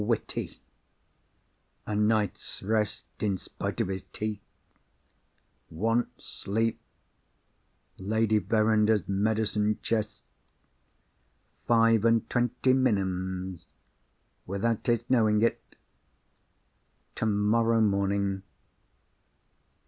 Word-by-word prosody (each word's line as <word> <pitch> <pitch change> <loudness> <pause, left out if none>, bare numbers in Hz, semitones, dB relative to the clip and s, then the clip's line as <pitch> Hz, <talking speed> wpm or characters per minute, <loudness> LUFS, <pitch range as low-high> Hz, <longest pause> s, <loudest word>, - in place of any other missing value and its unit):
witty... 115 +1 -2 1.3
a 105 - -3
night's 105 -2 0
rest 105 0 0 0.2
in 100 -3 0
spite - - -5
of - - +1
his 95 0 -3
teeth... 105 -1 -4 1.3
wants 115 +8 -1
sleep... 115 +3 -2 1.2
Lady 110 +2 +1
Verinder's 110 -1 +2
medicine 105 +1 +1
chest... 105 -2 -2 1.4
five 115 -2 +4
and 115 0 +3
twenty 125 +1 +2
minims... 95 -7 -1 0.8
without 100 +4 -1
his 120 -1 +1
knowing 110 -4 +3
it... 115 - +1 1.5
tomorrow 115 +2 +2
morning 100 -2 +1
105 Hz, 75 wpm, -28 LUFS, 100-115 Hz, 1.5 s, five